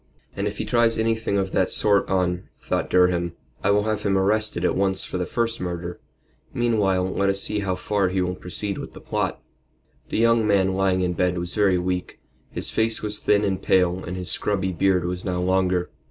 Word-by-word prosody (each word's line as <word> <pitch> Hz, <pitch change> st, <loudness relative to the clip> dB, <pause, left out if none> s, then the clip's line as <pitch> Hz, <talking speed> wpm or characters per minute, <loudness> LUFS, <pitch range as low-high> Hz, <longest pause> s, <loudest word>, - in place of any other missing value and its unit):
"And 100 Hz, +1 st, -1 dB
if 105 Hz, 0 st, -5 dB
he -, -, -3 dB
tries 120 Hz, -2 st, +2 dB
anything 110 Hz, -2 st, 0 dB
of 95 Hz, -1 st, -1 dB
that 95 Hz, -, +1 dB
sort 100 Hz, -2 st, +3 dB
on," 90 Hz, -2 st, 0 dB
thought -, -, -2 dB
Durham, 90 Hz, -2 st, +2 dB, 0.3 s
"I'll 100 Hz, +1 st, +3 dB
have 110 Hz, -1 st, -1 dB
him 100 Hz, -2 st, +1 dB
arrested 100 Hz, -2 st, +1 dB
at -, -, +1 dB
once 95 Hz, -1 st, +1 dB
for 90 Hz, -, -4 dB
the 90 Hz, -, -2 dB
first 115 Hz, -1 st, -1 dB
murder. 85 Hz, -1 st, -4 dB, 0.6 s
Meantime, 95 Hz, -6 st, +1 dB
let 100 Hz, 0 st, +2 dB
us 100 Hz, 0 st, +4 dB
see 105 Hz, +1 st, 0 dB
how 95 Hz, -2 st, -1 dB
far 100 Hz, 0 st, 0 dB
he 95 Hz, +1 st, -1 dB
will 90 Hz, 0 st, 0 dB
proceed 95 Hz, +2 st, -4 dB
with -, -, -8 dB
the -, -, -10 dB
plot." -, -, -2 dB, 0.7 s
The -, -, -2 dB
young 115 Hz, -1 st, +3 dB
man 95 Hz, -2 st, +3 dB
lying 95 Hz, -1 st, +1 dB
in 90 Hz, -1 st, 0 dB
bed 90 Hz, +1 st, 0 dB
was 85 Hz, 0 st, -2 dB
very 100 Hz, -4 st, +3 dB
weak. 90 Hz, 0 st, -3 dB, 0.3 s
His -, -, -3 dB
face 110 Hz, 0 st, 0 dB
was 105 Hz, 0 st, -2 dB
thin 105 Hz, 0 st, +2 dB
and 95 Hz, -2 st, -1 dB
pale 90 Hz, 0 st, +2 dB
and 90 Hz, +2 st, -5 dB
his 90 Hz, -1 st, -2 dB
scrubby 95 Hz, -2 st, -1 dB
beard 90 Hz, 0 st, +1 dB
was 90 Hz, +1 st, -3 dB
now 90 Hz, -2 st, -2 dB
longer. 90 Hz, -1 st, +1 dB
95 Hz, 205 wpm, -23 LUFS, 90-105 Hz, 0.7 s, us